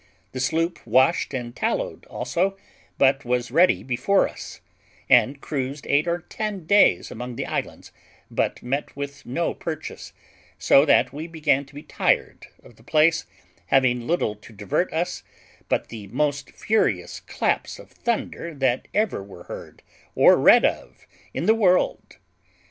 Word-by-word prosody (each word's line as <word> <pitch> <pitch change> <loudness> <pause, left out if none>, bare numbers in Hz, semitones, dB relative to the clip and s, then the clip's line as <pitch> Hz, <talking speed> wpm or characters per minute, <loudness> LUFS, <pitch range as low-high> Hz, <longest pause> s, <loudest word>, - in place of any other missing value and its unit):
The 130 - -6
sloop 165 +6 0
washed 130 +8 +2
and 120 -3 -5
tallowed - - -2
also, 195 +3 -1 0.4
but 135 +1 +3
was 125 0 -1
ready 175 +6 +4
before 135 +10 +2
us, - - -10 0.5
and 140 +2 +5
cruised 140 0 -4
eight 145 +4 +2
or 170 0 -1
ten 205 -1 -5
days 200 - +4
among 125 +1 -6
the - - -3
islands, - - -5 0.4
but - - -1
met 135 +4 -3
with 140 0 -7
no 165 +7 -1
purchase; 155 -2 -7 0.5
so 140 - +5
that 130 -4 +3
we 155 +3 -6
began 150 -4 0
to 140 - -19
be 145 - -8
tired - - -1 0.2
of 115 - -18
the 110 - -20
place, 155 +4 +2 0.4
having 125 -3 +2
little 165 -10 0
to 105 - -15
divert 105 - -2
us 170 +2 -2 0.5
but - - -1
the 110 -3 -8
most 140 +4 -1
furious 220 0 -1
claps - - -2
of - - -15
thunder 190 -8 -3
that 130 -2 0
ever 210 - +1
were 95 -3 -12
heard - - -10 0.3
or - - +7
read - - +6
of - - -3 0.3
in - - -3
the 220 - +5
world. 190 -5 +1
140 Hz, 150 wpm, -23 LUFS, 125-170 Hz, 0.5 s, or